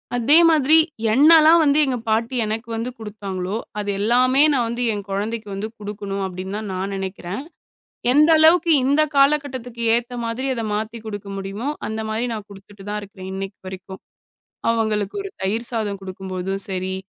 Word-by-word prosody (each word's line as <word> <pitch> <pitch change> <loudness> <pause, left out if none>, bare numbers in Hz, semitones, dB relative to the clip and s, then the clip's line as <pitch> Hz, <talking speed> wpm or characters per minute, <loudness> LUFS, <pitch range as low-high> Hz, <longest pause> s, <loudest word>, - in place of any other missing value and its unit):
அதே 260 +7 +5
மாதிரி 310 -1 +4 0.4
என்னெல்லாம் 315 +5 +7
வந்து 290 0 +3
எங்க 260 -2 -1
பாட்டி 230 +3 0
எனக்கு 220 +2 -4
வந்து 230 +2 -3
குடுத்தாங்களோ, 200 -3 -5 0.2
அது 205 -1 -3
எல்லாமே 250 +5 +3
நான் 250 -4 +1
வந்து 235 +2 -3
என் 205 -1 -5
கொழந்தைக்கு 210 +3 -3
வந்து 195 +2 -4
குடுக்கணும் 200 -1 -5
அப்டின்தான் 190 +3 -6
நான் 190 +2 -3
நெனைக்கிறேன். 190 +4 -5 0.7
எந்த 300 +3 +5
அளவுக்கு 330 +2 +5
இந்தக் 300 +3 +2
காலகட்டத்துக்கு 275 -4 +1
ஏத்த 240 +1 -4
மாதிரி 230 +3 -3
அத 230 - -3
மாத்தி 220 +2 -4
குடுக்க 205 -2 -6
முடியுமோ, 195 +6 -5 0.2
அந்த 220 +1 -4
மாதிரி 220 +3 -1
நான் 215 -2 -6
குடுத்துட்டுதான் 205 +1 -8
இருக்கிறேன் 190 -2 -10
இன்னைக்கு 195 0 -6
வரைக்கும். 190 0 -9 0.7
அவங்களுக்கு 215 -3 -1
ஒரு 395 - -7
தயிர் 220 +5 -1
சாதம் 210 -4 -2
குடுக்கும்போதும் 190 0 -5
சரி, 190 0 -3
220 Hz, 150 wpm, -21 LUFS, 195-250 Hz, 0.7 s, என்னெல்லாம்